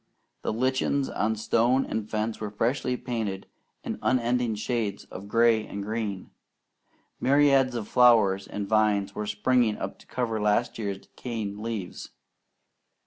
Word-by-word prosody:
The -, -, -1 dB
lichens 130 Hz, +4 st, 0 dB
on 110 Hz, +1 st, 0 dB
stone 120 Hz, +4 st, +2 dB
and 110 Hz, -1 st, -4 dB
fence 110 Hz, +1 st, -2 dB
were 105 Hz, -, -3 dB
freshly 125 Hz, +4 st, -1 dB
painted 110 Hz, -7 st, -3 dB, 0.4 s
in -, -, -4 dB
unending 120 Hz, -2 st, +1 dB
shades 110 Hz, -2 st, -2 dB
of 100 Hz, +2 st, -8 dB
gray 115 Hz, 0 st, +3 dB
and 100 Hz, 0 st, -5 dB
green. 105 Hz, -3 st, -4 dB, 0.9 s
Myriads 135 Hz, -2 st, +4 dB
of 110 Hz, -3 st, -3 dB
flowers 110 Hz, -6 st, +4 dB
and 100 Hz, -1 st, -4 dB
vines 105 Hz, -2 st, +2 dB
were 105 Hz, +1 st, -4 dB
springing 110 Hz, +2 st, +2 dB
up -, -, -5 dB
to -, -, -19 dB
cover 115 Hz, -4 st, -2 dB
last 105 Hz, +3 st, +1 dB
year's 100 Hz, -3 st, -2 dB
decaying 105 Hz, -1 st, -6 dB
leaves. 110 Hz, -5 st, -5 dB
110 Hz, 140 wpm, -27 LUFS, 105-125 Hz, 0.9 s, Myriads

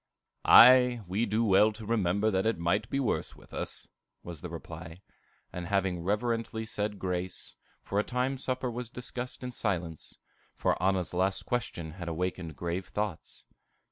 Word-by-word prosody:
"Aye, 125 Hz, -1 st, +8 dB
we 100 Hz, +6 st, 0 dB
do 110 Hz, +3 st, +1 dB
well 105 Hz, +1 st, +5 dB
to 110 Hz, 0 st, -9 dB
remember 105 Hz, -1 st, +1 dB
that 95 Hz, +2 st, +1 dB
it 115 Hz, -, +1 dB
might 85 Hz, +6 st, 0 dB
be 135 Hz, -, 0 dB
worse 130 Hz, -, -1 dB
with -, -, -18 dB
us," -, -, -3 dB, 0.4 s
was 85 Hz, -4 st, -8 dB
the 90 Hz, -, -6 dB
reply; 85 Hz, +2 st, -9 dB, 0.5 s
and 90 Hz, -1 st, -5 dB
having 95 Hz, -3 st, 0 dB
reverently 110 Hz, +3 st, -1 dB
said 105 Hz, -1 st, -3 dB
grace, 90 Hz, -1 st, -3 dB, 0.3 s
for 100 Hz, -, -1 dB
a -, -, +2 dB
time 130 Hz, +3 st, -1 dB
supper 130 Hz, -1 st, -2 dB
was 120 Hz, 0 st, -5 dB
discussed 125 Hz, +1 st, -6 dB
in 125 Hz, -, -4 dB
silence, 90 Hz, -9 st, -3 dB, 0.4 s
for -, -, +1 dB
Anna's 95 Hz, -2 st, +1 dB
last 95 Hz, +2 st, +1 dB
question 110 Hz, -10 st, -3 dB
had 90 Hz, +1 st, -8 dB
awakened 85 Hz, -1 st, -3 dB
grave 85 Hz, +3 st, -3 dB
thoughts. 105 Hz, -5 st, -4 dB
100 Hz, 160 wpm, -30 LUFS, 90-115 Hz, 0.5 s, Aye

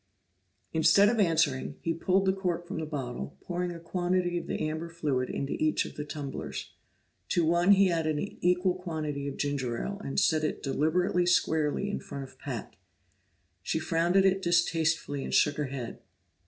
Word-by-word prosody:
Instead 165 Hz, +6 st, +5 dB
of 230 Hz, 0 st, 0 dB
answering, 165 Hz, -8 st, +2 dB
he 165 Hz, -, +1 dB
pulled 190 Hz, +4 st, +1 dB
the 190 Hz, -, +3 dB
cork 180 Hz, -3 st, -2 dB
from 185 Hz, -3 st, -4 dB
the 160 Hz, -, -4 dB
bottle, 135 Hz, -3 st, -5 dB
pouring 180 Hz, 0 st, -3 dB
a 170 Hz, -, -7 dB
quantity 175 Hz, +1 st, 0 dB
of 175 Hz, -, -3 dB
the -, -, -2 dB
amber 160 Hz, +2 st, -4 dB
fluid 145 Hz, -6 st, -1 dB
into 140 Hz, -, -2 dB
each 155 Hz, 0 st, +2 dB
of -, -, -8 dB
the 150 Hz, -, -4 dB
tumblers. 145 Hz, -2 st, -6 dB, 0.6 s
To 170 Hz, -, +2 dB
one 175 Hz, +4 st, +5 dB
he 195 Hz, -2 st, +5 dB
added 155 Hz, -2 st, 0 dB
an 200 Hz, +7 st, -4 dB
equal 180 Hz, +1 st, +3 dB
quantity 155 Hz, -6 st, -4 dB
of 140 Hz, -, -5 dB
ginger 135 Hz, -5 st, -1 dB
ale, 200 Hz, +1 st, -4 dB
and 135 Hz, -, -1 dB
set 155 Hz, -1 st, +3 dB
it 155 Hz, -, -2 dB
deliberately 175 Hz, +5 st, +1 dB
squarely 160 Hz, +1 st, +2 dB
in 205 Hz, -, -2 dB
front 140 Hz, -, -7 dB
of 130 Hz, -1 st, -13 dB
Pat. 125 Hz, -7 st, -6 dB, 0.8 s
She 90 Hz, -, -1 dB
frowned 165 Hz, +3 st, +1 dB
at 195 Hz, -, +5 dB
it 190 Hz, 0 st, +3 dB
distastefully, 165 Hz, -5 st, +1 dB
and -, -, -2 dB
shook 145 Hz, -2 st, +4 dB
her 150 Hz, -, 0 dB
head. 130 Hz, -3 st, -6 dB
165 Hz, 180 wpm, -29 LUFS, 145-180 Hz, 0.8 s, Instead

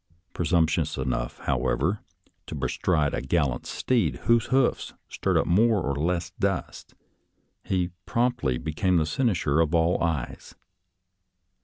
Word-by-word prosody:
Presumptuous 80 Hz, -2 st, +1 dB
enough, 65 Hz, -2 st, -2 dB
however, 90 Hz, +9 st, 0 dB, 0.5 s
to -, -, -6 dB
bestride 75 Hz, -6 st, 0 dB
a -, -, -1 dB
gallant 65 Hz, -2 st, 0 dB
steed, 115 Hz, -11 st, 0 dB
whose 115 Hz, -1 st, +3 dB
hoofs 130 Hz, -1 st, +1 dB
stirred -, -, 0 dB
up -, -, +2 dB
more 110 Hz, +4 st, +3 dB
or 70 Hz, -5 st, -1 dB
less 85 Hz, +4 st, -1 dB
dust, 95 Hz, -3 st, -3 dB, 0.7 s
he 90 Hz, -2 st, -1 dB, 0.2 s
promptly 115 Hz, -, 0 dB
became 85 Hz, -, 0 dB
the 80 Hz, -, +2 dB
cynosure 85 Hz, -, +1 dB
of 80 Hz, +1 st, +1 dB
all 85 Hz, +2 st, +2 dB
eyes. 80 Hz, -7 st, -3 dB
85 Hz, 125 wpm, -26 LUFS, 75-95 Hz, 0.7 s, whose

